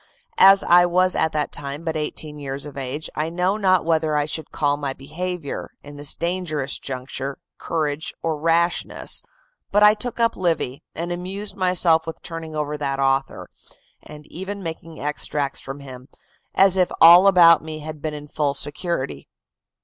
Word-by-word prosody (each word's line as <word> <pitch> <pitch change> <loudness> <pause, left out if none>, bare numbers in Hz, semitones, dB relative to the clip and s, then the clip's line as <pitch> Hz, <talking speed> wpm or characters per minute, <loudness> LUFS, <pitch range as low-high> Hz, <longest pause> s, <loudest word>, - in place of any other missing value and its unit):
As 195 +1 +8
I 175 0 +6
was 185 +1 +2
at 160 - +1
that 150 -1 -1
time 140 +2 -6
but 160 -1 -3
eighteen 150 0 -5
years 140 0 -5
of 145 - -9
age, 140 +3 -4
I 155 +2 -1
know 180 +3 0
not 185 -5 +2
whether 160 -2 +1
I 145 - +1
should 155 +1 -5
call 145 -1 +1
my 140 -2 -3
behavior, 160 +3 -6
in 145 0 -11
this 145 0 -4
dangerous 170 -5 -2
juncture, 135 +1 -5 0.2
courage 155 -2 -2
or 160 -2 -1
rashness; 165 +2 0 0.5
but 205 +1 +4
I 210 0 +8
took 240 +2 -5
up 230 0 +2
Livy, 165 -7 -1
and 170 +2 -4
amused 190 +3 -5
myself 180 -4 +2
with 165 - -7
turning 165 -2 -7
over 150 0 -2
that 135 -2 -2
author, 135 0 0 0.5
and 150 0 -12
even 195 +5 -7
making 165 -1 -7
extracts 145 -1 -2
from 135 +1 -8
him, 130 -2 -11 0.5
as 190 -1 +6
if 180 -1 +2
all 175 +4 +9
about 170 -4 +7
me 155 -1 -7
had 155 -1 -8
been 155 -1 -3
in 150 0 -9
full 145 -1 -1
security. 145 0 -3
160 Hz, 170 wpm, -22 LUFS, 145-180 Hz, 0.5 s, all